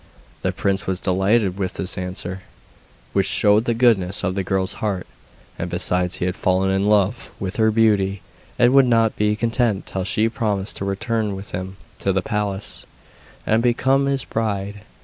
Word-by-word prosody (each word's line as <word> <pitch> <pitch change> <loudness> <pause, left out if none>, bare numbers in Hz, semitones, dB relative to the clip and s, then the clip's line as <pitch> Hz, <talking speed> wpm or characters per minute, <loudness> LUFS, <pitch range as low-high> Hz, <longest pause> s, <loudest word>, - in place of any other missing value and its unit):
The - - 0
prince 100 -1 -1
was 95 -1 -1
delighted 95 +1 +1
with 95 -2 -2
this 95 -1 -3
answer, 90 0 -5 0.7
which - - +2
showed 105 +2 +4
the 120 - +1
goodness 105 -6 +2
of 90 - 0
the 100 - -1
girl's 95 +1 0
heart, 100 -4 -1 0.5
and - - -3
besides 90 0 0
he - - -2
had 90 0 -1
fallen 95 +1 +1
in 95 +1 +1
love 105 +2 +2
with 95 -1 -4
her 110 -1 +4
beauty, 105 -4 +2 0.3
and 120 +1 +4
would 135 -2 +6
not 115 -2 +3
be 105 0 +1
content 115 -2 0
till 95 - -3
she 110 +3 +1
promised 105 -3 -2
to 95 - -4
return 110 +1 -1
with 95 +1 -9
him 95 +2 -5 0.2
to 100 - 0
the 95 -1 0
palace, 105 -1 -3 0.6
and 110 +1 +2
become 130 +3 +2
his 135 -1 -1
bride. 100 -2 -3
100 Hz, 175 wpm, -21 LUFS, 95-110 Hz, 0.7 s, would